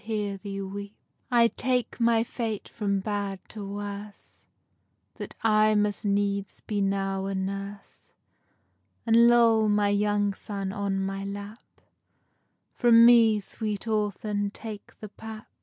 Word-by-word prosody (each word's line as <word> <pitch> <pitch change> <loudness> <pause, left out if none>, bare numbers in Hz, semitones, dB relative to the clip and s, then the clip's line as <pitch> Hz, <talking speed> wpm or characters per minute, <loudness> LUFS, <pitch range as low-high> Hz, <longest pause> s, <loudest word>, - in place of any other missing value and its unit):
_ 200 -1 -4 0.4
I 235 -2 +5
take 250 +1 -1
my 230 -1 +3
fate 225 -3 -4
from 200 -2 -2
bad 200 -1 -3
to 215 -2 -8
worse, 205 +1 -8 0.7
That - - -7
I 215 -1 +4
must 210 0 0
needs 200 0 -1
be 205 -2 -2
now 195 0 -1
a 195 - -3
nurse, 195 +1 -6 0.9
And 230 +1 +6
lull 230 -2 +5
my 205 -1 +2
young 205 0 +1
son 195 -1 -5
on 195 -1 -1
my 195 0 -4
lap: 200 +2 -7 1.1
From 235 -2 +6
me, 230 -3 +6
sweet 210 +2 -5
orphan, 210 -1 -1
take 210 0 -10
the 215 - -7
pap. 220 +1 -10
205 Hz, 125 wpm, -27 LUFS, 200-220 Hz, 1.1 s, And